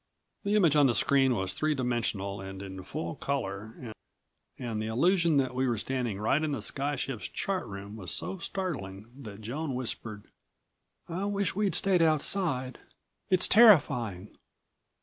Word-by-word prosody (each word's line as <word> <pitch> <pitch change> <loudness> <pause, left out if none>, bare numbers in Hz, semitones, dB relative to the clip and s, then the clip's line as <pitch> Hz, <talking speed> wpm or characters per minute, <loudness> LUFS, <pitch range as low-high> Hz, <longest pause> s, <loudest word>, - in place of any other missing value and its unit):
The 205 0 +1
image 170 -8 +4
on 145 -2 +6
the 120 - +1
screen 135 -3 +3
was 95 -2 -1
three 155 +8 0
dimensional, 115 -6 -2
and 95 0 -7
in 95 -1 -7
full 85 -2 -5
color 110 -3 -4 0.6
and 115 -4 -4
the 110 - -3
illusion 165 - +3
that 130 -2 +1
we 130 +1 0
were 120 -2 0
standing 120 -2 -2
right 120 +8 +2
in 155 -2 -1
the 130 - -3
sky 145 +4 -1
ship's 130 -4 -4
chart 195 -2 -3
room 100 +1 -8
was 95 -5 -6
so 190 - -3
startling 115 - -5
that 110 -6 -10
Joan 135 +5 -4
whispered: 110 -4 -4 0.8
"I 180 +4 -3
wish 200 -2 -1
we'd 205 -1 +1
stayed 190 -3 +3
outside. 155 -5 +1 0.5
It's 185 -1 +4
terrifying. 125 - +4
130 Hz, 155 wpm, -29 LUFS, 105-160 Hz, 0.8 s, on